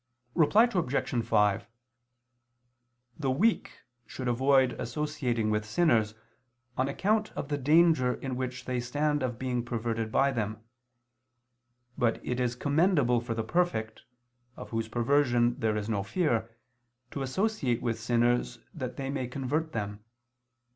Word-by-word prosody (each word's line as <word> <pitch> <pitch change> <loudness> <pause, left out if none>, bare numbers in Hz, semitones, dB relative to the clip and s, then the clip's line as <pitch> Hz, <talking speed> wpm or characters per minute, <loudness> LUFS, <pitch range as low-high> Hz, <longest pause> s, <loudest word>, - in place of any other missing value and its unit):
Reply 185 +8 +5
Obj. 140 - 0
5: 105 -3 +2 1.5
The 140 -3 0
weak 195 - +1 0.3
should 125 +2 -5
avoid 130 +1 +3
associating 125 -8 -1
with 105 0 0
sinners, 110 -3 +2 0.6
on 130 - +1
account 215 +9 0
of 140 - -5
the 145 - 0
danger 150 -3 +4
in 130 -2 -5
which 125 0 -4
they 125 -1 -1
stand 145 +4 0
of 125 -2 -2
being 125 -1 -2
perverted 115 -2 -3
by 140 +3 +3
them. 110 -3 -3 1.4
But 120 -3 +1
it 125 0 -2
is 125 -1 0
commendable 145 -3 +2
for 120 -1 -4
the 110 - -1
perfect, 110 -6 -1 0.6
of - - -9
whose 115 -1 -2
perversion 120 0 +2
there 110 -1 0
is 105 0 -3
no 105 -3 0
fear, 115 - 0 0.6
to 140 - -4
associate 135 - -1
with 115 -2 -1
sinners 120 0 +1 0.2
that 125 -5 -5
they 135 0 -3
may 130 -3 -2
convert 145 +5 -2
them. 105 -3 -4
125 Hz, 135 wpm, -29 LUFS, 115-145 Hz, 1.5 s, Reply